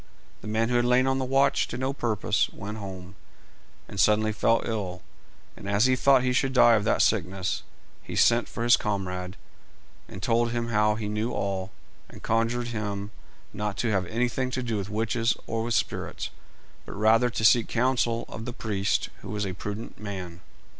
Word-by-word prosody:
The - - -9
man 110 +2 0
who 120 - +2
had 120 - +2
lain 125 +1 +4
on 135 0 +1
the 130 - -1
watch 135 +1 +2
to 120 - -5
no 130 +2 -1
purpose 115 -6 0
went 105 +2 -7
home, 95 -2 -8 0.7
and 100 - -7
suddenly 110 +2 +4
fell 115 +2 +2
ill; 95 -5 -4 0.5
and 100 - -8
as 100 +3 +3
he 130 0 +4
thought 135 0 +4
he 125 0 +1
should 135 +1 +1
die 120 -2 +6
of 105 -3 +3
that - - +3
sickness, 95 -2 0 0.4
he - - -8
sent 120 0 +4
for 115 - -4
his 120 0 +6
comrade, 90 -3 -3 0.7
and 95 - -9
told 120 0 +2
him 120 0 -2
how 105 -1 +2
he 110 -1 -4
knew 105 +3 -2
all, 95 -1 -2 0.4
and - - -13
conjured 115 +2 0
him 105 -2 -4 0.4
not 105 -1 -3
to 115 - 0
have 95 -4 0
anything 125 +4 -1
to 130 0 -3
do 115 -2 -2
with 100 0 -4
witches 115 +2 0
or 115 0 -2
with 115 -1 -1
spirits, - - -2 0.6
but - - -7
rather 110 +4 +4
to 110 -1 -1
seek 115 0 +5
counsel 120 -1 +1
of 110 - -7
the 120 - -5
priest, 105 -5 -1
who - - -10
was 105 0 -2
a 95 - -3
prudent 105 +4 -6
man. 95 -4 -7
110 Hz, 190 wpm, -26 LUFS, 100-120 Hz, 0.7 s, die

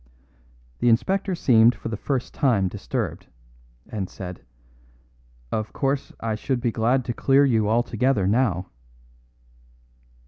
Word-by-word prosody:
The 120 - +3
inspector 190 - +1
seemed 120 -6 +5
for 110 - -6
the 110 - -3
first 130 +3 -3
time 115 -9 +2
disturbed, 95 - -4 0.6
and 100 -4 -4
said, 90 -7 -8 1.1
"Of 110 -1 -3
course 135 0 -1
I 115 -1 -2
should 125 +4 -2
be 120 -1 0
glad 120 +3 +1
to 120 - -2
clear 135 +4 +4
you 110 -5 +2
altogether 120 -1 +1
now." 100 -4 +1
115 Hz, 125 wpm, -24 LUFS, 105-130 Hz, 1.1 s, seemed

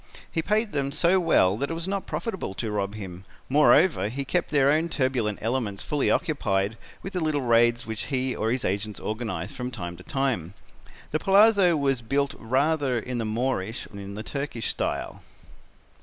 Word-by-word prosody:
He 165 - 0
paid 210 +5 0
them 140 -1 -1
so 170 +5 +3
well 105 - +3
that 140 +4 -2
it 165 - -2
was 165 +2 -4
not 195 0 -2
profitable 190 - -4
to 110 0 -3
rob 100 0 -2
him; 95 -3 -8 0.3
moreover 150 - +4
he 135 +4 -4
kept 175 +5 0
their 140 -2 +4
own 160 +3 +1
turbulent 130 -8 0
elements 110 -4 -1
fully 145 -2 0
occupied 105 - 0 0.3
with 195 - -6
the 180 - -1
little 155 -4 0
raids 120 0 +3
which 110 -1 -4
he 130 -2 -1
or 110 - -1
his 130 0 -1
agents 100 +2 -2
organized 105 -5 -4
from 125 -1 -4
time 90 -8 -5
to 90 - -12
time. 115 - -1 0.6
The 155 - +1
palazzo 195 -3 +5
was 135 -3 +1
built 140 +4 0
rather 135 +2 +1
in 120 +1 -3
the 115 - -1
Moorish 110 -1 -1
than 100 - -9
in 100 0 -7
the 110 - -5
Turkish 140 -5 -3
style. - - -3
130 Hz, 185 wpm, -26 LUFS, 110-150 Hz, 0.6 s, palazzo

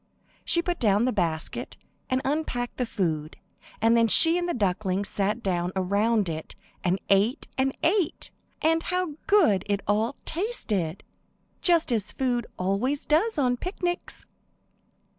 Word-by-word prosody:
She 340 - +1
put 350 -1 -2
down 210 0 +3
the 255 - +1
basket, 165 -5 -2 0.3
and 260 0 0
unpacked 265 -4 -2
the 250 - -1
food, 160 -7 -2 0.4
and 230 +1 +4
then 230 -1 +4
she 325 +9 +6
and 350 0 -1
the - - 0
ducklings 195 -2 0
sat 210 +4 -1
down 180 -2 -1
around 200 +3 +1
it, 160 -1 -5 0.3
and 185 +1 +1
ate 205 +8 +2
and 265 0 0
ate. 360 -1 0 0.3
And 325 +1 +3
how 360 -2 -2
good 330 - +4
it 200 -1 0
all 220 +6 +1
tasted! 215 - -2 0.6
Just 335 -5 +3
as 210 -3 -1
food 245 -3 -1
always 200 +10 -1
does 345 +8 +2
on 250 -3 +2
picnics. 355 - -4
235 Hz, 140 wpm, -26 LUFS, 195-315 Hz, 0.6 s, she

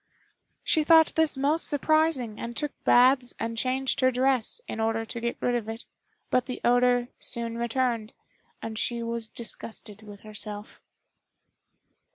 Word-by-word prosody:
She 315 - +3
thought 320 +1 +6
this 320 -3 +1
most 295 +4 +1
surprising, 290 -6 +1
and 235 0 -6
took 295 -1 0
baths 250 0 +4
and 230 0 -3
changed 260 +3 -1
her 255 - +4
dress, 260 - +1
in - - -5
order 225 0 0
to 235 - -6
get 235 0 -2
rid 245 - 0
of 230 -3 -2
it; 225 +1 -6 0.5
but 255 0 +2
the 255 - -5
odor 245 0 +3
soon 230 -1 -3
returned, 235 -2 -1 0.5
and 220 -1 -4
she 235 0 -1
was 230 -1 -3
disgusted 220 -2 -3
with 205 -2 -12
herself. 210 -1 -8
240 Hz, 150 wpm, -27 LUFS, 225-265 Hz, 0.5 s, thought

